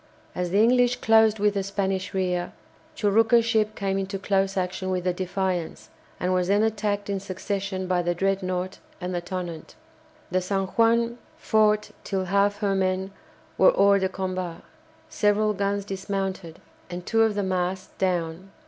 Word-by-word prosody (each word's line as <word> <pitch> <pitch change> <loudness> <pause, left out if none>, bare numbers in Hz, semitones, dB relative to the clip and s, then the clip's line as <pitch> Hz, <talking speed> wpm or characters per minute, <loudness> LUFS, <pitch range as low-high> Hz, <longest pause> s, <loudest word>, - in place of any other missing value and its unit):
As 180 -1 -2
the 190 - +1
English 245 +2 +4
closed 220 -2 +4
with 205 0 +2
the 200 - 0
Spanish 195 -1 -2
rear, 180 -2 -1 0.4
Churucca's 225 +3 +3
ship 215 -2 +1
came 195 -1 -1
into 195 +1 -3
close 195 0 0
action 185 0 -2
with 185 -1 -1
the 180 0 +1
"Defiance," 185 -1 -3 0.3
and 180 +1 0
was 180 -1 +1
then 205 +2 +3
attacked 210 -2 -1
in 200 -1 -1
succession 190 0 -4
by 180 -1 +1
the 175 0 -1
"Dreadnought" 185 -1 -1 0.2
and 180 0 -4
the 175 - -1
"Tonnant." 175 -3 -6 0.6
The 185 0 +1
"San 195 +1 -1
Juan" 235 +2 +2 0.2
fought 215 -1 +2
till 190 -2 -2
half 200 +2 +2
her 200 -1 +1
men 190 0 0 0.5
were - - +7
hors 200 0 +5
de 190 - +1
combat, 185 -3 -4 0.5
several 210 -4 +2
guns 200 0 -1
dismounted, 195 -3 -4 0.3
and 175 0 -6
two 225 -1 +2
of 220 -2 +3
the 205 - 0
masts 185 0 -2
down. 180 0 -1
195 Hz, 160 wpm, -25 LUFS, 185-205 Hz, 0.6 s, were